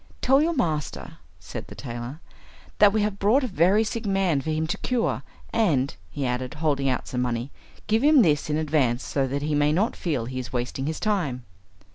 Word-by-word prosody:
"Tell 270 +2 +4
your 335 +2 +1
master," 155 - -2 0.2
said 80 - -8
the - - -10
tailor, 120 +4 -7 0.6
"that 205 -1 +7
we 215 0 +1
have 205 -1 -2
brought 230 +8 +3
a - - 0
very 190 +2 +3
sick 230 +1 -3
man 190 -7 +2
for 160 - -5
him 155 0 0
to 160 - -2
cure; 245 -2 0 0.3
and," 145 - +2
he 135 +10 -3
added, 125 0 -2
holding 145 -3 0
out 125 - -2
some 125 - -2
money, 120 +1 -2 0.3
"give 220 +3 +1
him 295 -4 +6
this 150 -2 +1
in 150 - +1
advance, 145 -6 +1
so 135 -2 -1
that 140 +2 -3
he 150 0 -1
may 145 0 +3
not 195 +9 +1
feel 145 -10 -2
he 130 +1 -4
is 125 -1 -6
wasting 125 +2 -3
his 160 0 -3
time." 160 - -1
155 Hz, 205 wpm, -25 LUFS, 130-205 Hz, 0.6 s, that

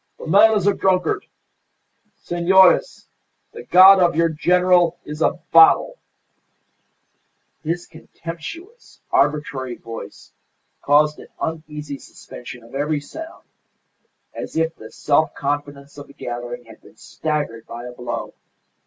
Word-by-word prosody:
"The - - -10
man 210 +6 +5
is 195 - -2
a 205 - +4
drunkard. 195 - 0 0.9
Senores, 190 - +3 0.5
the 460 - -10
God 190 +2 +7
of 175 -2 +3
your 165 +1 +2
General 175 +1 +2
is 150 +1 -7
a - - +3 0.2
bottle!" 165 -1 +5 1.6
His 170 +3 -3
contemptuous, 170 - -10
arbitrary 140 -4 0
voice 115 0 -10 0.5
caused 150 +1 +3
an - - -12
uneasy 150 -3 -5
suspension 120 -1 -12
of 115 - -17
every 145 +2 -1
sound, 320 - -10 0.9
as - - -7
if 160 0 0
the - - -12
self 155 +1 +1
confidence 145 0 -4
of 145 - -10
the 140 - -16
gathering 120 -1 -7
had 110 -1 -16
been - - -20
staggered 145 -8 -4
by 120 +1 -8
a 125 - -7
blow. 120 -1 -6
155 Hz, 125 wpm, -21 LUFS, 140-180 Hz, 1.6 s, God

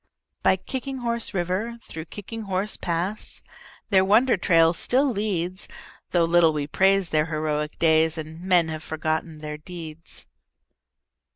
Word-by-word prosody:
By - - +4
Kicking 265 +8 -5
Horse 235 -2 -2
River, 195 +5 -2
through 160 0 -7
Kicking 210 +5 -8
Horse 195 +2 -1
Pass, 175 +5 -3 0.5
Their 190 -1 +5
wonder 225 +6 +4
trail 165 -3 +4
still 255 - +2
leads, 195 -7 -2 0.4
Though 175 -2 +3
little 165 -1 +4
we 150 -1 -2
praise 190 +3 +3
their 155 0 +1
heroic 155 -1 -2
days 160 0 +3
And 160 +1 -7
men 180 -3 +3
have 155 -1 -5
forgotten 160 0 -3
their 150 0 -6
deeds. 165 -1 -9
175 Hz, 135 wpm, -25 LUFS, 160-195 Hz, 0.5 s, Their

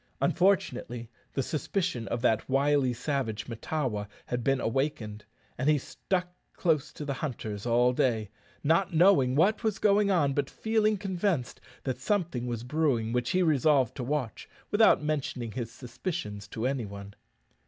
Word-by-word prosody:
Unfortunately, 125 - +1 0.2
the 135 - 0
suspicion 160 - -2
of 115 +1 -3
that 110 -1 +2
wily 140 -1 +3
savage 125 -4 -2
Mahtawa 115 -3 -3 0.2
had 125 -1 -3
been 135 +1 +2
awakened, 115 -5 -2 0.3
and 135 +4 +2
he 155 - +5
stuck 180 +6 -2 0.2
close 160 -6 +1
to 150 - -7
the 140 - -1
hunters 120 -7 -4
all 120 +1 +4
day 110 -5 0 0.3
not 165 +4 +2
knowing 155 -7 +5
what 195 +10 +3
was 220 -3 0
going 205 -1 +3
on, 155 -8 +3
but 140 -1 -1
feeling 215 -1 +1
convinced 185 -8 -1 0.2
that 130 -2 -2
something 170 - -1
was 120 -1 -3
brewing 125 -5 0
which 125 0 0
he 185 0 +2
resolved 145 -5 +3
to 130 - -4
watch, 130 -3 -3 0.2
without 210 -7 +5
mentioning 140 -6 -2
his 115 -1 -4
suspicions 120 - -5
to 110 +3 -4
any 130 -4 -1
one. 100 0 -9
135 Hz, 155 wpm, -29 LUFS, 120-170 Hz, 0.3 s, he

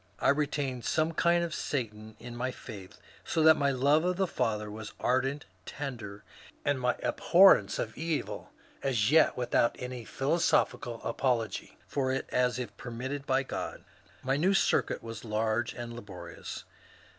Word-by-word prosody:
I - - +2
retained 140 -3 0
some 155 +1 +1
kind 170 +1 +3
of 170 -1 -3
Satan 110 -7 -4
in 120 -1 -8
my 125 +2 -1
faith, 105 -7 -10 0.3
so 160 - 0
that 160 0 +8
my 140 -2 +2
love 140 +4 +3
of 180 0 0
the 190 - +2
Father 105 - -1
was 110 0 -8
ardent, 135 +3 0 0.2
tender, 115 -8 -6 0.4
and 145 -2 +1
my 125 0 +2
abhorrence 175 - +5
of 110 - -3
evil 160 -1 -3 0.3
as 120 -3 +1
yet 160 0 +5
without 120 -1 +2
any 125 -1 -6
philosophical 135 -4 0
apology 115 -6 -1
for 130 -2 -1
it 135 - -2
as 125 0 +2
if 115 -5 -5
permitted 130 +4 -5
by - - +2
God. - - -5 0.4
My 135 +1 +1
new 185 +6 +3
circuit - - +2
was 115 -1 -7
large 110 +1 0
and 120 -1 -7
laborious. 90 -7 -8
125 Hz, 155 wpm, -30 LUFS, 115-145 Hz, 0.4 s, that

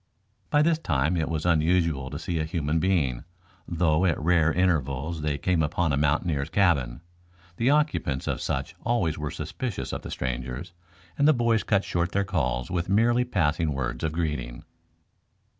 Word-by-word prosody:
By 145 0 +4
this 160 0 +2
time 75 - 0
it 80 -2 -1
was 80 -1 -2
unusual 80 -4 +2
to 70 - -5
see 85 +1 -3
a - - +1
human 80 -1 -1
being, 80 -10 +1 0.4
though 85 -1 +1
at 85 -4 +1
rare 80 0 +3
intervals 80 -3 0
they 75 -1 -1
came 85 +3 +1
upon 80 +1 0
a - - +3
mountaineer's 75 0 0
cabin. 80 -10 +1 0.6
The 120 +3 +2
occupants 145 - +1
of - - -2
such 65 0 -2
always 105 -11 0
were 75 -1 -3
suspicious 95 - -5
of - - -3
the - - -8
strangers, 65 +6 -4 0.5
and 145 - +5
the 155 - +7
boys 115 -3 +2
cut 100 -2 +1
short 85 0 -1
their 100 - +2
calls 65 - -1
with 90 -1 -2
merely 120 +5 +3
passing 80 -8 0
words 60 -1 -3
of 80 - 0
greeting. 75 -7 -3
80 Hz, 170 wpm, -26 LUFS, 70-90 Hz, 0.6 s, the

